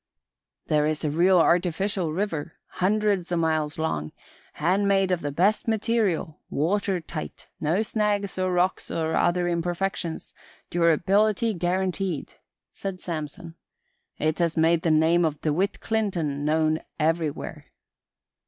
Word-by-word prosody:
"There 150 Hz, -1 st, +2 dB
is 155 Hz, 0 st, -1 dB
a 150 Hz, -, 0 dB
real 180 Hz, +4 st, +4 dB
artificial 175 Hz, +1 st, +2 dB
river, 165 Hz, -3 st, -3 dB, 0.3 s
hundreds 200 Hz, -2 st, +1 dB
o' 175 Hz, -, +1 dB
miles 160 Hz, -1 st, 0 dB
long, 80 Hz, -, -2 dB, 0.4 s
handmade 195 Hz, +3 st, +2 dB
of 180 Hz, -2 st, 0 dB
the 145 Hz, -, -3 dB
best 195 Hz, +11 st, +2 dB
material, 215 Hz, -8 st, 0 dB
water 190 Hz, +5 st, 0 dB
tight, 160 Hz, -1 st, -7 dB
no 165 Hz, +8 st, +1 dB
snags 205 Hz, -3 st, -1 dB
or 185 Hz, 0 st, +1 dB
rocks 180 Hz, +1 st, 0 dB
or 160 Hz, 0 st, -1 dB
other 175 Hz, 0 st, +2 dB
imperfections, 175 Hz, 0 st, -2 dB, 0.4 s
durability 195 Hz, +7 st, +2 dB
guaranteed," 180 Hz, -2 st, -2 dB, 0.4 s
said 195 Hz, -2 st, -5 dB
Samson. 165 Hz, -1 st, -6 dB, 0.6 s
"It 155 Hz, +2 st, 0 dB
has 170 Hz, -2 st, +1 dB
made 165 Hz, +1 st, +3 dB
the 165 Hz, -, +1 dB
name 160 Hz, +2 st, +4 dB
of 155 Hz, -2 st, 0 dB
DeWitt 175 Hz, +7 st, 0 dB
Clinton 175 Hz, -10 st, -1 dB
known 155 Hz, +1 st, +2 dB, 0.2 s
everywhere." 160 Hz, -1 st, -1 dB
175 Hz, 125 wpm, -25 LUFS, 160-195 Hz, 0.6 s, real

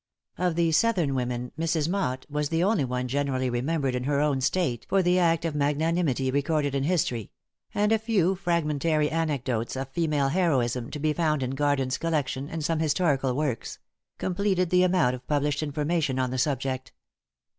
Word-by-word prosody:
Of 180 Hz, -2 st, +1 dB
the 170 Hz, -1 st, +2 dB
Southern 175 Hz, -6 st, +2 dB
women, 125 Hz, -1 st, -2 dB
Mrs. 160 Hz, -2 st, 0 dB
Motte 165 Hz, -9 st, -1 dB
was 150 Hz, 0 st, -2 dB
the 165 Hz, +1 st, +1 dB
only 195 Hz, -6 st, +2 dB
one 125 Hz, 0 st, -2 dB
generally 130 Hz, -1 st, -1 dB
remembered 135 Hz, +2 st, -1 dB
in 125 Hz, 0 st, -2 dB
her 140 Hz, 0 st, +1 dB
own 145 Hz, -3 st, +1 dB
State 135 Hz, -5 st, 0 dB
for 195 Hz, 0 st, +3 dB
the 180 Hz, +1 st, +3 dB
act 170 Hz, -1 st, +2 dB
of 165 Hz, -, -1 dB
magnanimity 145 Hz, -2 st, +1 dB
recorded 145 Hz, +1 st, 0 dB
in 135 Hz, 0 st, 0 dB
history; 135 Hz, -, 0 dB, 0.5 s
and 210 Hz, +1 st, +2 dB
a 225 Hz, -, +4 dB
few 205 Hz, -5 st, +2 dB
fragmentary 160 Hz, -4 st, 0 dB
anecdotes 135 Hz, -8 st, -1 dB
of 135 Hz, 0 st, -4 dB
female 150 Hz, -2 st, 0 dB
heroism, 130 Hz, -8 st, +1 dB
to -, -, -5 dB
be 155 Hz, +1 st, +1 dB
found 155 Hz, -4 st, 0 dB
in 130 Hz, -, -2 dB
Garden's 135 Hz, -2 st, 0 dB
collection, 145 Hz, -4 st, -1 dB
and 160 Hz, -2 st, -4 dB
some 165 Hz, -1 st, 0 dB
historical 145 Hz, -5 st, +1 dB
works 135 Hz, -5 st, -2 dB, 0.4 s
completed 185 Hz, -1 st, 0 dB
the 180 Hz, 0 st, +5 dB
amount 180 Hz, -8 st, +3 dB
of 125 Hz, 0 st, -8 dB
published 145 Hz, 0 st, 0 dB
information 150 Hz, -1 st, -1 dB
on 130 Hz, -1 st, 0 dB
the 130 Hz, -, -2 dB
subject. 130 Hz, -1 st, -2 dB
150 Hz, 175 wpm, -26 LUFS, 130-165 Hz, 0.5 s, the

